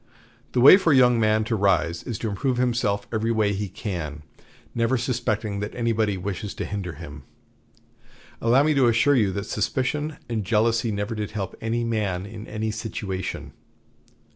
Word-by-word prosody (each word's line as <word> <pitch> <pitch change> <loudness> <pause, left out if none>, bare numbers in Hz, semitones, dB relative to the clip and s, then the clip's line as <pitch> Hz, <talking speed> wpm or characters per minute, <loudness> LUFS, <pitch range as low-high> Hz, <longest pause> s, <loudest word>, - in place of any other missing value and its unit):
The 125 - +2
way 145 +8 +10
for 180 -5 +2
a - - +5
young 125 -2 +5
man 110 0 +3
to 115 +1 -1
rise 90 -4 +1
is 120 -5 -5
to 115 - -3
improve 125 +5 -1
himself 120 -5 0
every 110 +1 0
way 110 -2 +1
he 100 0 -3
can, 85 -7 -5 0.5
never 115 +3 +1
suspecting 115 -4 -2
that 105 +1 -5
anybody 110 -4 0
wishes 95 +2 -5
to - - -4
hinder 100 -4 -4
him. 75 -1 -10 1.2
Allow 125 +4 +4
me 155 +1 +3
to 135 -4 +4
assure 120 +5 +4
you 105 -6 +2
that 100 +2 -3
suspicion 140 +8 -2
and 115 -3 -2
jealousy 115 +2 +1
never 105 +2 -3
did 105 -2 -3
help 100 -3 -4
any 115 +1 -1
man 105 -5 -1
in 105 +1 -9
any 110 0 -3
situation. 105 -4 -5
110 Hz, 170 wpm, -24 LUFS, 100-120 Hz, 1.2 s, way